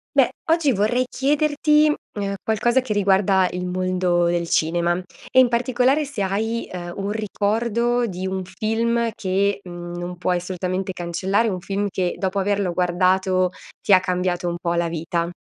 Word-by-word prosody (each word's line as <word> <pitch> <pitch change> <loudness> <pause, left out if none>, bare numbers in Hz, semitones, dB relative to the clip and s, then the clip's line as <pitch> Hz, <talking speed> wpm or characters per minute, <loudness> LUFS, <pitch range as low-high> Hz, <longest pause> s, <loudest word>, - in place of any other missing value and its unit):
Beh, - - +5 0.2
oggi 325 -4 +3
vorrei 220 +6 +1
chiederti, 300 +2 +2 0.2
mhmm, 200 -1 -2
qualcosa 240 +4 +2
che 255 - -7
riguarda 195 -2 +3
il 180 0 -4
mondo 180 -1 +1
del 170 0 0
cinema, 170 +2 +1 0.4
e - - +5
in 255 - +7
particolare 250 +4 +1
se 265 -8 -3
hai, 220 +4 -1
uhm, 175 -1 -6
un 200 +1 -2
ricordo 225 +3 0
di 185 -2 -5
un 190 0 -2
film 225 +5 0
che, 200 +1 0
mhmm, 175 -1 -8
non 175 0 -5
puoi 180 0 0
assolutamente 185 +1 -3
cancellare, 185 +5 0
o 195 - -2
un 180 - -4
film 200 +2 -2
che 180 -2 -1
dopo 190 0 -1
averlo 195 -2 0
guardato 185 +1 +2 0.3
ti 200 - +2
ha 185 - +8
cambiato 180 -1 -1
un 170 - -1
po' 170 0 -1
la 170 0 +1
vita. 170 +1 -2
190 Hz, 165 wpm, -22 LUFS, 180-225 Hz, 0.4 s, ha